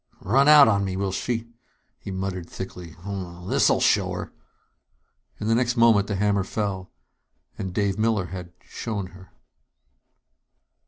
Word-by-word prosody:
"Run 135 Hz, +8 st, +3 dB
out 150 Hz, -2 st, +9 dB
on 100 Hz, -2 st, +2 dB
me, 95 Hz, -1 st, -3 dB
will 100 Hz, 0 st, -1 dB
she!" 115 Hz, +4 st, -3 dB, 0.5 s
he -, -, -9 dB
muttered 95 Hz, -2 st, -4 dB
thickly. 90 Hz, -3 st, -8 dB
"Well 90 Hz, -3 st, -6 dB
this'll -, -, +3 dB
show -, -, +2 dB
her!" -, -, -6 dB, 1.1 s
In -, -, -4 dB
the 110 Hz, -, +2 dB
next 120 Hz, +1 st, +1 dB
moment 115 Hz, -4 st, +5 dB
the 105 Hz, -, -2 dB
hammer 100 Hz, 0 st, +1 dB
fell... 95 Hz, -2 st, -4 dB, 0.6 s
and 95 Hz, -, -5 dB
Dave 100 Hz, +1 st, -1 dB
Miller 110 Hz, -4 st, +1 dB
had 90 Hz, 0 st, -8 dB
"shown 100 Hz, -5 st, -5 dB
her." 95 Hz, -1 st, -14 dB
100 Hz, 145 wpm, -24 LUFS, 95-110 Hz, 1.1 s, out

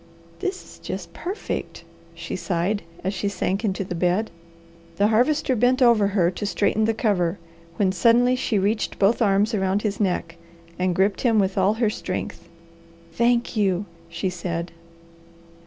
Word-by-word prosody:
"This 380 Hz, -1 st, -3 dB
is -, -, -15 dB
just -, -, -6 dB
perfect!" 375 Hz, +5 st, -5 dB, 0.3 s
she -, -, -5 dB
sighed, 175 Hz, +3 st, -1 dB, 0.2 s
as 190 Hz, +2 st, -1 dB
she 200 Hz, -, -2 dB
sank 195 Hz, +2 st, -2 dB
into 195 Hz, -2 st, -1 dB
the 180 Hz, -, -5 dB
bed. 180 Hz, +5 st, 0 dB, 0.6 s
The 205 Hz, +4 st, +3 dB
Harvester 255 Hz, +4 st, +2 dB
bent 245 Hz, +3 st, +3 dB
over 235 Hz, -5 st, +5 dB
her 190 Hz, -4 st, +2 dB
to 205 Hz, -, -5 dB
straighten 215 Hz, +1 st, +1 dB
the 225 Hz, 0 st, +1 dB
cover, 195 Hz, -6 st, +1 dB, 0.4 s
when 190 Hz, 0 st, +2 dB
suddenly 235 Hz, +6 st, +4 dB
she 235 Hz, -4 st, 0 dB
reached 205 Hz, +3 st, 0 dB
both 210 Hz, +5 st, +3 dB
arms 205 Hz, +1 st, +3 dB
around 195 Hz, 0 st, 0 dB
his 210 Hz, -2 st, -2 dB
neck, 180 Hz, -4 st, -1 dB, 0.4 s
and 180 Hz, -1 st, +1 dB
gripped 195 Hz, +2 st, +1 dB
him 230 Hz, -3 st, +3 dB
with 195 Hz, -2 st, +2 dB
all 195 Hz, +2 st, +2 dB
her 225 Hz, -2 st, +1 dB
strength. 185 Hz, -3 st, -5 dB, 0.6 s
"Thank 235 Hz, +6 st, +1 dB
you!" 200 Hz, -2 st, +1 dB, 0.2 s
she 185 Hz, +2 st, -2 dB
said. 170 Hz, -1 st, -4 dB
200 Hz, 155 wpm, -23 LUFS, 185-225 Hz, 0.6 s, over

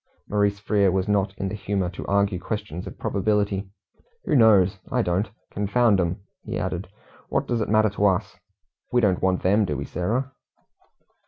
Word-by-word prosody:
Maurice 100 Hz, -1 st, +1 dB
Frere 100 Hz, -2 st, +2 dB
was 95 Hz, +1 st, 0 dB
not 100 Hz, -1 st, 0 dB
in 95 Hz, -, -2 dB
the 95 Hz, -, -4 dB
humour 100 Hz, -2 st, -1 dB
to 90 Hz, -, -7 dB
argue 100 Hz, -2 st, +1 dB
questions 90 Hz, -4 st, -5 dB
of -, -, -9 dB
probability. 100 Hz, -1 st, 0 dB, 0.6 s
"Who -, -, +1 dB
knows? 100 Hz, -6 st, +5 dB
I 125 Hz, -1 st, +2 dB
don't. 90 Hz, +3 st, 0 dB, 0.2 s
Confound 105 Hz, +1 st, +2 dB
'em," 90 Hz, +2 st, -1 dB, 0.2 s
he -, -, -4 dB
added, 90 Hz, +2 st, -3 dB, 0.4 s
"what -, -, 0 dB
does 120 Hz, -2 st, 0 dB
it -, -, -2 dB
matter 110 Hz, -1 st, +3 dB
to 100 Hz, +1 st, +2 dB
us? 95 Hz, -2 st, 0 dB, 0.6 s
We 125 Hz, -, +3 dB
don't 100 Hz, -6 st, +2 dB
want 95 Hz, -1 st, +1 dB
them, 100 Hz, +4 st, +4 dB
do 75 Hz, -8 st, -2 dB
we, -, -, -4 dB
Sarah?" 120 Hz, +10 st, -2 dB
100 Hz, 175 wpm, -24 LUFS, 95-105 Hz, 0.6 s, knows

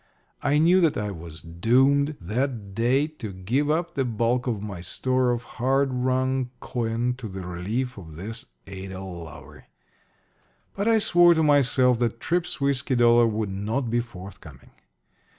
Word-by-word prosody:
I 145 Hz, +1 st, +2 dB
knew 175 Hz, +4 st, +5 dB
that 165 Hz, -4 st, +2 dB
I 105 Hz, -1 st, -2 dB
was 85 Hz, -3 st, -9 dB
doomed 130 Hz, -, +2 dB
that 110 Hz, +1 st, -3 dB
day 125 Hz, +7 st, +2 dB
to 150 Hz, -9 st, -8 dB
give 115 Hz, +11 st, -1 dB
up 170 Hz, +2 st, 0 dB
the 135 Hz, -, 0 dB
bulk 120 Hz, +1 st, 0 dB
of 115 Hz, -4 st, -1 dB
my 100 Hz, -4 st, -6 dB
store 130 Hz, +6 st, 0 dB
of 120 Hz, 0 st, -1 dB
hard 135 Hz, +3 st, 0 dB
wrung 130 Hz, 0 st, 0 dB
coin 120 Hz, 0 st, -2 dB
to 120 Hz, -, -6 dB
the 95 Hz, 0 st, -7 dB
relief 105 Hz, +8 st, -3 dB
of 80 Hz, -4 st, -11 dB
this 115 Hz, -, -6 dB, 0.2 s
Ada 95 Hz, -1 st, -7 dB
Lowery. 85 Hz, -5 st, -10 dB, 1.1 s
But 200 Hz, +2 st, -1 dB
I 225 Hz, -1 st, +5 dB
swore 175 Hz, -4 st, +5 dB
to 160 Hz, -, +2 dB
myself 130 Hz, -4 st, +4 dB
that 115 Hz, -1 st, -1 dB
Tripp's 175 Hz, +3 st, -1 dB
whiskey 140 Hz, -1 st, 0 dB
dollar 120 Hz, -1 st, +5 dB
would 110 Hz, -2 st, -2 dB
not 110 Hz, +6 st, -2 dB
be 120 Hz, -, +2 dB
forthcoming. 100 Hz, -5 st, -10 dB
120 Hz, 155 wpm, -25 LUFS, 100-135 Hz, 1.1 s, knew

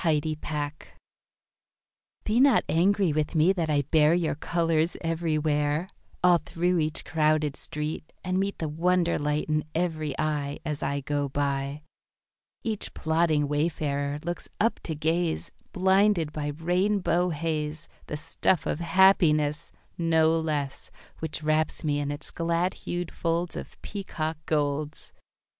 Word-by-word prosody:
Apology 155 Hz, -2 st, +1 dB, 1.9 s
Be 220 Hz, +3 st, +1 dB
not 275 Hz, 0 st, +5 dB
angry 185 Hz, 0 st, +3 dB
with 155 Hz, +2 st, -1 dB
me 165 Hz, +4 st, +5 dB
that 170 Hz, -4 st, -1 dB
I 145 Hz, -1 st, +2 dB
bear 155 Hz, +3 st, +4 dB
Your 175 Hz, -2 st, +1 dB
colours 165 Hz, +1 st, 0 dB
everywhere, 155 Hz, -1 st, 0 dB, 0.3 s
All 175 Hz, -1 st, +6 dB
through 175 Hz, +3 st, 0 dB
each 155 Hz, 0 st, -2 dB
crowded 155 Hz, -2 st, +1 dB
street, 150 Hz, +1 st, -4 dB
And 185 Hz, 0 st, 0 dB
meet 200 Hz, +1 st, -1 dB
The 160 Hz, -, -2 dB
wonder 170 Hz, +3 st, +1 dB
light 150 Hz, 0 st, 0 dB
in 155 Hz, -1 st, +1 dB
every 155 Hz, -4 st, -1 dB
eye, 145 Hz, -2 st, -1 dB
As 150 Hz, -2 st, -3 dB
I 140 Hz, +1 st, -1 dB
go 145 Hz, 0 st, -1 dB
by. 140 Hz, +1 st, -2 dB, 0.8 s
Each 220 Hz, -3 st, -3 dB
plodding 160 Hz, -2 st, +2 dB
wayfarer 145 Hz, -1 st, -1 dB
looks 175 Hz, 0 st, -4 dB
up 225 Hz, +2 st, +2 dB
to 160 Hz, -, -3 dB
gaze, 160 Hz, +2 st, -1 dB, 0.2 s
Blinded 190 Hz, -3 st, +3 dB
by 150 Hz, -1 st, -3 dB
rainbow 180 Hz, +3 st, +1 dB
haze, 155 Hz, -1 st, -3 dB, 0.2 s
The 150 Hz, -, -4 dB
stuff 160 Hz, +3 st, 0 dB
of -, -, -1 dB
happiness, 165 Hz, -4 st, +3 dB, 0.3 s
No 160 Hz, -1 st, +4 dB
less, 155 Hz, -4 st, -2 dB, 0.3 s
Which 160 Hz, 0 st, -5 dB
wraps 155 Hz, +1 st, +1 dB
me 145 Hz, -2 st, +1 dB
in 145 Hz, -1 st, -2 dB
its 145 Hz, +1 st, -3 dB
glad 170 Hz, +2 st, 0 dB
hued 175 Hz, -1 st, -4 dB
folds 170 Hz, +1 st, -1 dB
Of -, -, -8 dB
peacock 165 Hz, -6 st, -4 dB
golds. 150 Hz, 0 st, -1 dB
160 Hz, 135 wpm, -27 LUFS, 150-175 Hz, 1.9 s, All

